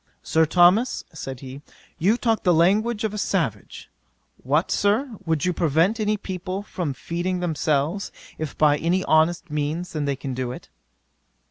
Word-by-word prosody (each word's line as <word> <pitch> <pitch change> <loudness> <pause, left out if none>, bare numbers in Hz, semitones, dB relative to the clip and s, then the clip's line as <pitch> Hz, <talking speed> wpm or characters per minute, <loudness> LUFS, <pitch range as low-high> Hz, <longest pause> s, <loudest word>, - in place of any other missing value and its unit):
"Sir 160 0 +2
Thomas, 180 +9 +4
(said 135 -5 -7
he,) 135 +1 -9 0.4
you 205 +8 +3
talk 225 -3 +1
the 180 -3 +3
language 210 +7 +2
of 215 -1 -1
a 210 - -4
savage: - - -2 0.5
what, - - +1
Sir? 220 +5 +1
would 160 0 +1
you 180 - +1
prevent 170 - +2
any 215 0 +1
people 190 0 -5
from 170 -9 -4
feeding 175 +5 -3
themselves, 160 +1 -1 0.3
if 155 -2 -5
by 150 -1 +4
any 180 +3 +1
honest 165 +1 +2
means 150 +4 -2
they 145 -3 -1
can 135 0 -5
do 125 -1 -3
it." - - -10
175 Hz, 155 wpm, -23 LUFS, 150-200 Hz, 0.5 s, Thomas